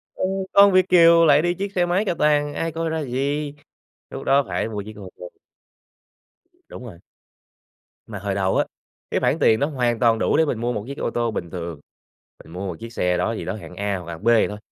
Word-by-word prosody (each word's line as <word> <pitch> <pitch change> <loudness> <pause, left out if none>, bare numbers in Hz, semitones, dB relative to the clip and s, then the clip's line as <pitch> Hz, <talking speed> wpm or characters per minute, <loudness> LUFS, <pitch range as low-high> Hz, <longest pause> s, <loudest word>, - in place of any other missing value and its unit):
Ừ, - - -4 0.3
con 200 0 +7
Việt 185 0 +3
kiều 170 -1 +6
lại 145 0 +5
đi 175 +1 0
chiếc 195 +2 -5
xe 175 -1 +2
máy 185 +5 0
cà 175 - 0
tàng, 145 -2 +1
ai 165 0 -3
coi 165 +1 -3
ra 160 0 -2
gì, 140 +3 -2 0.6
lúc - - -7
đó 140 +1 +3
phải - - -2
mua 105 -2 -4
chiếc 110 +1 -10
ô 95 -3 -9
tô. 90 - -9 1.4
Đúng 125 - -9
rồi. 85 -8 -11 1.1
Mà 105 -3 -7
hồi 100 0 -3
đầu 95 -1 0
á, - - +2 0.5
cái - - +1
khoản - - 0
tiền 110 - +4
nó 145 - +1
hoàn 120 -6 -1
toàn 115 -2 +3
đủ - - +1
để 160 - +4
mình 125 - -2
mua 120 +1 -1
một 105 -2 -4
chiếc 140 +1 -7
ô - - -2
tô 120 -1 -1
bình 85 -5 -5
thường. 85 -3 -6 0.6
Mình 80 - -15
mua 95 +2 -5
một 85 -3 -6
chiếc 115 0 -9
xe 90 0 0
đó 110 +6 -1
gì - - -6
đó - - -3
hạng 90 -4 -11
A 100 0 -2
hoặc 85 -1 -8
hạng 85 +5 -9
B - - -3
gì 115 -2 +4
thôi, 105 - -7
120 Hz, 240 wpm, -22 LUFS, 100-160 Hz, 1.4 s, con